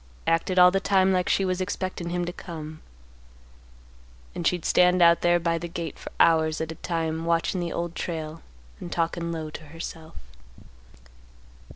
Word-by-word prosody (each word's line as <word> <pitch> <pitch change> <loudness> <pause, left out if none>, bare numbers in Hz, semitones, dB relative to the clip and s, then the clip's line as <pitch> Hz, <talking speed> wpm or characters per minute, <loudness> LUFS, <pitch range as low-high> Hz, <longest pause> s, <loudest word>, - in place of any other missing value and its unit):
Acted 165 +3 +1
all 180 0 +8
the 195 - +1
time 190 -1 +3
like 180 -1 +1
she 195 - +2
was 185 0 -1
expectin' 185 -2 -3
him 175 0 -1
to 175 - -5
come. 155 -3 -8 1.5
And 175 - -1
she'd 175 -3 0
stand 180 0 +4
out 170 -1 +6
there 175 0 +3
by 165 0 0
the 170 - -5
gate 170 -1 -6
for - - -8
hours 160 -1 +4
at 160 0 -3
a 160 - -11
time, 165 -1 -2
watchin' 170 +2 0
the 170 -1 -3
Old 170 0 -3
Trail 160 -2 -5 0.4
and 175 - -8
talkin' 170 0 -1
low 160 -2 -5
to 155 - -9
herself. 160 +1 -9
170 Hz, 170 wpm, -26 LUFS, 165-180 Hz, 1.5 s, all